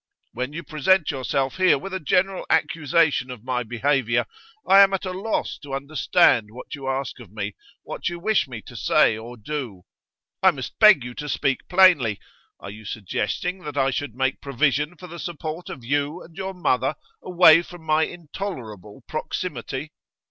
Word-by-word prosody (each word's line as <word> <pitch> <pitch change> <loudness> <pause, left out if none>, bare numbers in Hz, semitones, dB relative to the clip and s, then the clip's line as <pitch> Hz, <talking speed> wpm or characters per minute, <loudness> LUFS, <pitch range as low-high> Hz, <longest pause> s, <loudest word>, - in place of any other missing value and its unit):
When 125 +3 -3
you 165 +3 -6
present 155 +3 +2
yourself 135 0 -2
here 185 -5 +4
with 190 +8 -8
a 190 - -2
general 185 +5 +1
accusation 155 -4 +2
of 125 -4 -8
my 125 -1 -1
behaviour, 120 0 0 0.4
I 195 - +7
am 195 -1 +6
at 195 - -5
a 185 - -3
loss 200 +4 -2
to 140 -2 -6
understand 135 -5 +2
what 120 +4 -10
you 135 -2 -5
ask 135 -2 -3
of - - -13
me, 105 -1 -4 0.3
what - - -4
you 175 - -6
wish 205 -1 +1
me 120 -4 -8
to - - -13
say - - +3
or 115 +3 -9
do. 120 -6 -5 0.6
I - - +7
must - - -5
beg - - +7
you 125 0 -7
to 150 +3 -6
speak 135 0 -1
plainly. 175 - +5 0.4
Are 100 - -8
you 110 +2 -11
suggesting 105 - -3
that 150 -5 -7
I 135 -1 +2
should 130 -2 -4
make 130 0 -1
provision 145 +4 0
for 180 - -11
the 170 -1 -9
support 165 0 -6
of 125 - -8
you 145 +5 -1
and 165 - -16
your 190 0 -5
mother 135 -5 +1 0.3
away 170 -3 +6
from 175 -1 -12
my 155 0 +3
intolerable 130 - -8
proximity? 150 -3 -4
145 Hz, 175 wpm, -23 LUFS, 125-175 Hz, 0.6 s, I